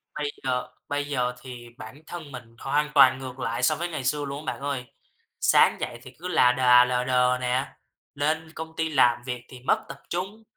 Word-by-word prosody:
bây 145 -1 -2
giờ 125 -1 -1 0.2
bây 145 0 -1
giờ 125 -4 -1
thì 125 -2 -9
bản 115 +6 -11
thân 160 -5 -8
mình 120 -3 -10
hoàn 145 +2 0
toàn 130 -2 +7
ngược 130 -1 -8
lại 120 0 -2
so - - +4
với 175 +1 -3
ngày 155 -5 -4
xưa 145 +3 0
luôn 140 +2 -6
á - - -1
bạn - - -13
ơi. 140 -3 -3 0.5
Sáng - - +5
dậy 120 - -4
thì 130 - -11
cứ 180 - -5
là 145 -8 +5
đà 125 -1 +6
lờ 125 0 0
đờ 125 0 +3
nè, 125 +1 0 0.5
lên 155 +2 -1
công 160 0 -7
ty 160 0 -1
làm 120 -5 +4
việc 125 -2 -4
thì 130 - -11
mất 125 - 0
tập - - -9
trung, 190 +5 -4
130 Hz, 215 wpm, -26 LUFS, 125-150 Hz, 0.5 s, toàn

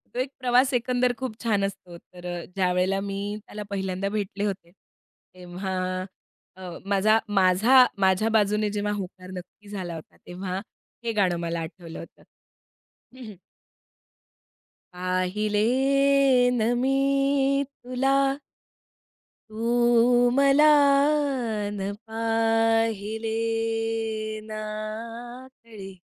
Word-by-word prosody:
तो - - -2
एक 260 +1 -1
प्रवास 255 +2 +3
एकंदर 245 0 +1
खूप 255 -4 -5
छान 205 -4 +1
असतो, 180 -3 -7
तर 180 +1 -15
अ, 170 - -6
ज्यावेळेला 185 +1 +1
मी 200 +1 -4
त्याला 210 0 -7
पहिल्यांदा 190 0 -2
भेटले 205 -1 -3
होते 185 -4 -4 0.6
तेव्हा 180 +1 -5 0.8
अ, 185 -1 -8 0.2
माझा 205 +2 +3 0.2
माझा 205 +7 +6
माझ्या 190 +3 +3
बाजूने 210 -1 +2
जेव्हा 205 0 -2
होकार 185 -1 -7
नक्की 185 +3 -11
झाला 180 -5 -5
होता 160 - -12
तेव्हा 185 +1 -4 0.4
हे 230 - -1
गाणं 190 -4 +2
मला 170 0 -3
आठवलं 165 0 -8
होतं - - -13 0.9
हं, 255 -2 -10
हं. 210 -3 -10 1.6
पाहिले 185 +4 -1 1.0
ना 220 - +1 0.2
मी 270 +1 +2 0.7
तुला. 265 0 -2 1.4
तू 240 +2 +3
मला 275 +2 +5 1.1
ना 195 - -3 0.2
पाहिले, 225 -1 0 1.1
ना 215 0 -6 1.0
कळे 200 -4 -10
205 Hz, 100 wpm, -25 LUFS, 185-230 Hz, 1.6 s, माझा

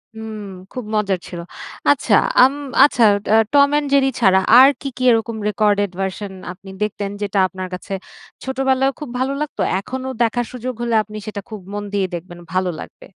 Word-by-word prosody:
হু, - - -9 0.5
খুব 250 - -5
মজার 200 -3 0
ছিল। 175 - -7 0.5
আচ্ছা 255 -6 +2 0.3
আম 265 +2 +5 0.3
আচ্ছা 265 -4 +4 0.3
আ - - +7 0.2
Tom& 280 0 +6 0.2
Jerry 275 -1 +4
ছাড়া 190 -5 +5 0.2
আর 265 +1 +9
কী, 275 - -4
কী 255 - -3
এরকম 225 0 0
রেকর্ডেড 205 -2 +1
ভার্শন 195 +1 -4 0.2
আপনি 195 +2 -13
দেখতেন 205 -1 -3
যেটা 200 -1 0
আপনার 185 +1 -6
কাছে 185 +2 -6 0.5
ছোটবেলায়ও 265 0 +1
খুব 300 - -6
ভালো 265 +2 0
লাগতো, 300 - -4 0.2
এখনো 260 +6 -6 0.2
দেখার 240 +1 0
সুযোগ 255 +1 -4
হলে 235 -1 0
আপনি 215 0 -10
সেটা 205 -1 -5
খুব 215 -2 -7
মন 205 0 -3
দিয়ে 195 -2 +1
দেখবেন 175 +1 -9
ভালো 185 0 +1
লাগবে। - - -11
215 Hz, 175 wpm, -19 LUFS, 195-260 Hz, 0.5 s, আর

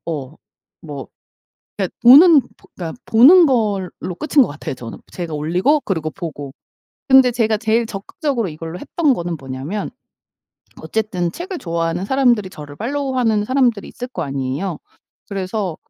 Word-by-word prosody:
어 155 -3 -5 0.5
뭐 145 -4 -8 0.7
그니까 195 -3 -1
보는 290 +6 +9 0.2
그니까 165 -3 -8
보는 310 +11 +7
걸로 205 -8 -1
끝인 295 - +3
거 - - 0
같아요 145 -2 -6
저는. 115 -2 -9
제가 170 -4 -5
올리고 180 - +1
그리고 160 - -3
보고. 145 -6 -7 0.6
근데 265 -2 +6
제가 225 -2 +1
제일 225 +2 +1
적극적으로 230 - -3
이걸로 165 +2 -7
했던 300 - +1
거는 175 -4 -4
뭐냐면 135 +9 -5 0.9
어쨌든 185 -6 -2
책을 360 - -6
좋아하는 165 - -2
사람들이 240 -5 +2
저를 145 -4 -10
팔로우하는 250 - 0
사람들이 245 -4 +1
있을 245 - -7
거 185 -9 -5
아니에요. 140 +5 -3 0.5
그래서 195 -2 -3
195 Hz, 330 characters per minute, -19 LUFS, 165-250 Hz, 0.9 s, 보는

